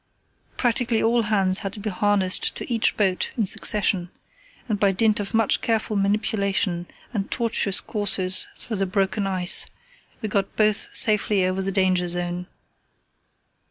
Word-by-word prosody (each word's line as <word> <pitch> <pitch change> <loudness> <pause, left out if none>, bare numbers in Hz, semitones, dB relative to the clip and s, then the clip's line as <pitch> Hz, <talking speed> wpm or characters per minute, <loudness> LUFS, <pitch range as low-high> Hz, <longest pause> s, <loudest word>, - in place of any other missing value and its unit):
Practically 240 -1 0
all 235 +1 +2
hands 195 -3 +2
had 195 -1 -5
to 215 - -8
be 210 +1 -4
harnessed 195 -1 +1
to - - -6
each 225 - +1
boat 190 -3 0
in 220 - +1
succession, 190 -2 +2 0.6
and 210 -4 -2
by 200 -1 +3
dint 215 +2 +1
of 205 +2 -4
much 225 -2 +2
careful 220 -1 -1
manipulation 200 -3 0 0.3
and 200 -3 -3
tortuous 225 -5 +1
courses 190 -3 0 0.2
amongst 220 -4 -3
the 195 - 0
broken 195 +1 -1
ice 185 -2 +2 0.5
we 215 - -4
got 200 -2 -2
both 215 -1 +2
safely 210 -3 +3
over 185 +1 -1
the 195 +1 -2
danger 185 -2 +1
zone. 175 0 -3
200 Hz, 150 wpm, -23 LUFS, 185-215 Hz, 0.6 s, by